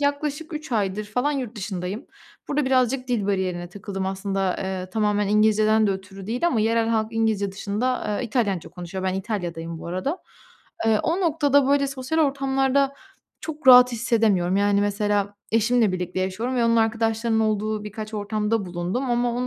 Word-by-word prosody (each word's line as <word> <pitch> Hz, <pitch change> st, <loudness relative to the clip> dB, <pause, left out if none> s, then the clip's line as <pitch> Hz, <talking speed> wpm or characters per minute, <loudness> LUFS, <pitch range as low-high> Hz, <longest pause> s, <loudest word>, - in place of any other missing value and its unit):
yaklaşık 290 Hz, +3 st, -2 dB
3 305 Hz, -4 st, -6 dB
aydır 205 Hz, -1 st, 0 dB
falan 250 Hz, +8 st, -1 dB
yurt 245 Hz, -5 st, -4 dB
dışındayım. 190 Hz, 0 st, -5 dB, 0.4 s
Burada 290 Hz, -1 st, 0 dB
birazcık 255 Hz, 0 st, +1 dB
dil 220 Hz, -5 st, 0 dB
bariyerine 185 Hz, -3 st, -1 dB
takıldım. 195 Hz, 0 st, -5 dB
Aslında, 195 Hz, -1 st, -1 dB
eee, 185 Hz, -1 st, -4 dB
tamamen 210 Hz, -1 st, +1 dB
İngilizce'den 215 Hz, +1 st, +3 dB
de -, -, +2 dB
ötürü 190 Hz, 0 st, -6 dB
değil 245 Hz, +9 st, 0 dB
ama 235 Hz, -10 st, +1 dB
yerel 225 Hz, +1 st, +2 dB
halk 220 Hz, -1 st, +1 dB
İngilizce 215 Hz, -3 st, 0 dB
dışında, 210 Hz, +2 st, -2 dB
eee, -, -, -2 dB
İtalyanca 205 Hz, -, -1 dB
konuşuyor, 180 Hz, +2 st, -6 dB
ben 185 Hz, -, 0 dB
İtalya'dayım 175 Hz, -5 st, -4 dB
bu -, -, -9 dB
arada. 185 Hz, -, -2 dB, 0.7 s
Eee, 215 Hz, -1 st, +3 dB
o 340 Hz, +4 st, 0 dB
noktada, 290 Hz, -5 st, +3 dB
böyle, 280 Hz, 0 st, +3 dB
sosyal 270 Hz, +3 st, -3 dB
ortamlarda 275 Hz, -1 st, +1 dB, 0.5 s
çok 310 Hz, -4 st, -3 dB
rahat 250 Hz, 0 st, +9 dB
hissedemiyorum, 215 Hz, -6 st, +1 dB
yani, 200 Hz, 0 st, +3 dB
mesela 205 Hz, 0 st, 0 dB, 0.2 s
eşimle 225 Hz, -1 st, +3 dB
birlikte 180 Hz, 0 st, -3 dB
yaşıyorum 215 Hz, +8 st, -2 dB
ve 235 Hz, -, +2 dB
onun 230 Hz, 0 st, +3 dB
arkadaşlarının 225 Hz, 0 st, +1 dB
olduğu 215 Hz, 0 st, -1 dB
birkaç 215 Hz, +1 st, -7 dB
ortamda 210 Hz, 0 st, -1 dB
bulundum 180 Hz, +9 st, -3 dB
ama 240 Hz, 0 st, +1 dB
o 250 Hz, +1 st, -2 dB
215 Hz, 165 wpm, -24 LUFS, 195-250 Hz, 0.7 s, rahat